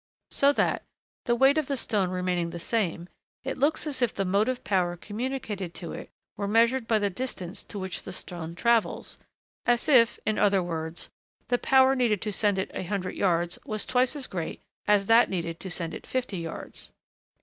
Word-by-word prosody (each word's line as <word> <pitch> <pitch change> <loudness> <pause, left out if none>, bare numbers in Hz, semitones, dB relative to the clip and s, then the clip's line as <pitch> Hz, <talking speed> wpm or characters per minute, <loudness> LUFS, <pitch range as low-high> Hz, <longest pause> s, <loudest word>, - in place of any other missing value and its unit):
So 280 0 +5
that, - - +1 0.4
the 240 - +2
weight 270 +5 +5
of 300 - -2
the 275 - -1
stone 205 -6 +1
remaining 180 -2 -1
the 170 0 -6
same, 175 -3 -1 0.4
it 265 - -2
looks 295 +5 +1
as 280 -4 -4
if 245 - +3
the 195 - -2
motive 210 +7 +1
power 180 -3 +1
communicated 210 -4 -4
to 170 - -5
it - - -8 0.3
were 200 - -2
measured 230 +3 +3
by 225 - +3
the 205 -1 0
distance 190 -4 -4
to - - -7
which 190 -1 -3
the - - -8
stone 170 -2 -6
travels 235 +3 +1 0.5
as 240 0 +3
if, 245 -6 +5
in 215 - +1
other 195 -2 +4
words, 165 -1 -4 0.4
the 245 0 +2
power 265 0 +5
needed 235 -6 +2
to 215 - -1
send 205 -1 +2
it 190 - -2
a - - -3
hundred 185 0 -3
yards 175 -2 +1
was 215 -1 -3
twice 255 +2 +2
as 280 -3 -4
great 175 -7 -4 0.3
as 205 -1 +4
that 225 +3 +6
needed 170 -3 -3
to 190 - -6
send 170 -2 -3
it - - -8
fifty 245 -8 -2
yards. 165 -1 -6
205 Hz, 195 wpm, -27 LUFS, 180-245 Hz, 0.5 s, that